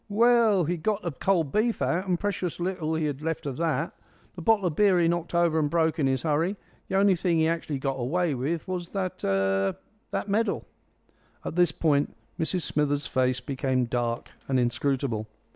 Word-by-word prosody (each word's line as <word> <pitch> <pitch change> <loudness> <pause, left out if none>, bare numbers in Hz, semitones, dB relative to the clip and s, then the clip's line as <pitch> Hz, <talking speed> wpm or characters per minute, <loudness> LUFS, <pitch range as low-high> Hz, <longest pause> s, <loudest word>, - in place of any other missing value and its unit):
"Well, 220 -4 +4
'e'd 175 -1 -2
got 210 +3 0
the 170 - -2
cold 165 0 0
beef 220 +5 +1
out, 180 +3 0
and 180 -2 +1
precious 185 -4 -2
little 175 -3 -1
he'd 160 -1 0
have 145 -1 -3
left 160 -1 -3
of 135 -1 -4
it. 165 -1 0 0.4
The 180 - -7
bottle 210 +1 +3
of 165 -4 0
beer 195 -2 +4
he 170 - +3
knocked 170 0 -1
over 170 -2 +3
and 150 -2 +1
broke 160 0 +1
in 140 - +3
his 130 0 0
hurry. 165 +5 +1 0.3
The 190 - -2
only 195 -1 +5
thing 170 -1 +1
he 160 0 +3
actually 165 -3 -1
got 135 0 -2
away 160 +6 0
with 150 +8 -2
was 180 -2 -4
that 190 -2 -4
er 95 0 +1 0.3
that - - -3
medal." 215 +3 0 0.8
At - - -4
this 175 -2 +4
point 145 -2 +1 0.2
Mrs 175 +2 0
Smithers' 145 -1 0
face 130 -1 +1
became 130 -1 0
dark 120 0 -2 0.2
and 130 -1 +2
inscrutable. 120 -2 0
160 Hz, 195 wpm, -27 LUFS, 135-180 Hz, 0.8 s, only